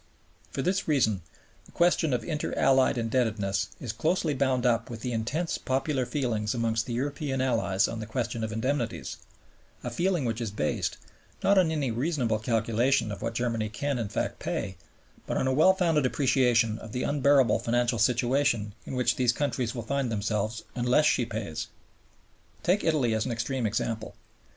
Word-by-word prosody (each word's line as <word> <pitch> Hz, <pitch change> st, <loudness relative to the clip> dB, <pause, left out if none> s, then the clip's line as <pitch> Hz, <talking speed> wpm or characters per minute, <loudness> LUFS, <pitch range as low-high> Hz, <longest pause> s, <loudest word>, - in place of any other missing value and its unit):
For 135 Hz, -, -3 dB
this 195 Hz, +2 st, 0 dB
reason 110 Hz, -, +2 dB, 0.4 s
the -, -, -18 dB
question 170 Hz, -3 st, +2 dB
of 125 Hz, -, 0 dB
Inter 155 Hz, -3 st, -3 dB
Allied 130 Hz, -1 st, +4 dB
indebtedness 110 Hz, -5 st, 0 dB
is 120 Hz, -4 st, -4 dB
closely 155 Hz, +6 st, 0 dB
bound 130 Hz, -2 st, +1 dB
up 115 Hz, -2 st, +2 dB
with 115 Hz, -2 st, -7 dB
the 125 Hz, -, -3 dB
intense 130 Hz, +10 st, -1 dB
popular 130 Hz, -1 st, -1 dB
feeling 120 Hz, -7 st, -1 dB
amongst 115 Hz, -1 st, 0 dB
the 120 Hz, -, -3 dB
European 140 Hz, +2 st, -2 dB
Allies 110 Hz, -6 st, +2 dB
on 115 Hz, -, -5 dB
the 110 Hz, -, -6 dB
question 115 Hz, -1 st, -2 dB
of 110 Hz, -, -2 dB
indemnities, 115 Hz, -, -2 dB, 0.7 s
a -, -, -3 dB
feeling 175 Hz, -5 st, 0 dB
which 115 Hz, 0 st, -2 dB
is 115 Hz, -, -2 dB
based, 100 Hz, -7 st, -2 dB, 0.5 s
not 200 Hz, 0 st, +5 dB
on 175 Hz, -3 st, +3 dB
any 145 Hz, -6 st, -1 dB
reasonable 120 Hz, -3 st, 0 dB
calculation 115 Hz, +2 st, +1 dB
of 100 Hz, -, -6 dB
what 115 Hz, 0 st, -3 dB
Germany 115 Hz, -3 st, -1 dB
can, 135 Hz, +4 st, -2 dB
in 110 Hz, -3 st, -2 dB
fact, -, -, -2 dB
pay, -, -, -3 dB, 0.5 s
but -, -, -1 dB
on -, -, +1 dB
a 130 Hz, -, +2 dB
well 160 Hz, +7 st, +6 dB
founded 165 Hz, -7 st, +2 dB
appreciation 120 Hz, -5 st, +2 dB
of 110 Hz, -, -10 dB
the 125 Hz, -, -1 dB
unbearable 140 Hz, -4 st, +3 dB
financial 120 Hz, 0 st, +1 dB
situation 120 Hz, -2 st, +2 dB
in -, -, -4 dB
which 125 Hz, -2 st, +1 dB
these 125 Hz, -2 st, +3 dB
countries 130 Hz, -2 st, -2 dB
will 120 Hz, -, -4 dB
find 135 Hz, +1 st, -1 dB
themselves 110 Hz, +1 st, -1 dB
unless 125 Hz, +4 st, +3 dB
she 125 Hz, -5 st, +2 dB
pays. 105 Hz, -8 st, -4 dB, 1.0 s
Take 190 Hz, +4 st, +2 dB
Italy 145 Hz, -8 st, +2 dB
as 110 Hz, +2 st, 0 dB
an -, -, -2 dB
extreme 120 Hz, +1 st, -1 dB
example. 110 Hz, +1 st, -3 dB
120 Hz, 175 wpm, -28 LUFS, 115-140 Hz, 1.0 s, well